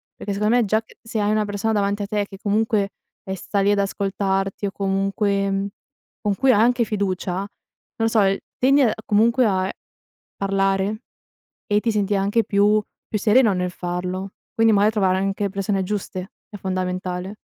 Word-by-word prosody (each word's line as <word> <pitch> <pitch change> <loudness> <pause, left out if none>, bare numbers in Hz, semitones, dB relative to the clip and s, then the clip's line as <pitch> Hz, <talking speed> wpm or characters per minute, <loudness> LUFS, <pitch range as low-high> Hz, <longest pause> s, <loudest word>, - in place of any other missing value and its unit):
perché 205 - -5
secondo 210 +4 +2
me 245 - +4
già 215 +2 +2 0.2
se 225 -1 -4
hai 205 0 +1
una 215 0 +2
persona 205 +2 -1
davanti 205 0 0
a - - -2
te 205 -1 -1
che 195 - -10
comunque, 210 0 +1 0.3
eh, 190 - -3
sta 200 +2 -2
lì 200 +1 +3
ad 205 - +2
ascoltarti 195 0 -1
o - - -4
comunque 195 0 0 0.5
con 205 -2 0
cui 265 +6 +4
hai 205 - +3
anche 240 +1 +3
fiducia, 190 -3 -2
non 200 - -4 0.5
lo 225 - +2
so, 225 -1 +3 0.4
tendi 275 +2 +4 0.2
comunque 230 +4 +3
a 190 -3 +1 0.7
parlare 195 +2 0 0.7
e 205 0 +3
ti 230 - +1
senti 205 -1 0
anche 200 +4 +1
più 210 +1 +3 0.3
più 215 - 0
sereno 220 +1 +4
nel 180 -1 -1
farlo. 180 +2 -4 0.2
Quindi 225 0 +4
magari 205 +1 +4
trovare 190 -4 +2
anche 195 +1 -1
persone 195 0 -1
giuste 190 -1 -4 0.2
è 205 - -9
fondamentale. 185 0 -3
200 Hz, 170 wpm, -22 LUFS, 195-215 Hz, 0.7 s, me